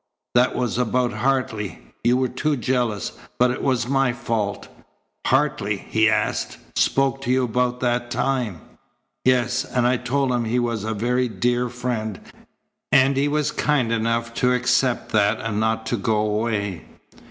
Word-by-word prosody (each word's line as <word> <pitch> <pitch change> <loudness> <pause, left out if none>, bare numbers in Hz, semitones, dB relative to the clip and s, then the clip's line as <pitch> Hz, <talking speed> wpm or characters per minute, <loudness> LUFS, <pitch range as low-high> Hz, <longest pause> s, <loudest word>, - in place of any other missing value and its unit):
That 125 +1 +3
was 125 -1 -1
about 125 0 +1
Hartley. 125 -7 -1 0.3
You 120 +1 +4
were 130 0 +1
too 145 +4 -1
jealous, 120 -5 -1 0.3
but 125 0 +4
it 125 - -4
was 125 -3 +1
my 135 -2 +2
fault." 115 -5 -2 0.6
"Hartley," 130 -7 +1
he 110 0 +4
asked, 110 - -1 0.2
"spoke 135 0 +2
to 125 - -4
you 130 0 +3
about 125 +1 0
that 120 -1 0
time?" 125 -8 -1 0.6
"Yes, 125 -1 +2
and 125 -1 -1
I 125 +1 +3
told 130 +2 0
him 120 -1 0
he 115 +3 0
was 120 -4 -1
a 110 0 -2
very 125 +4 +1
dear 120 +2 0
friend, 115 -4 -3 0.7
and 135 0 +5
he 140 +2 +2
was 150 0 0
kind 140 -8 +1
enough 115 +1 0
to 125 0 +4
accept 125 0 +1
that 105 0 +2
and 110 -2 -2
not 110 0 0
to 120 - -1
go 110 +2 0
away." 105 -4 -1
120 Hz, 160 wpm, -23 LUFS, 110-130 Hz, 0.7 s, and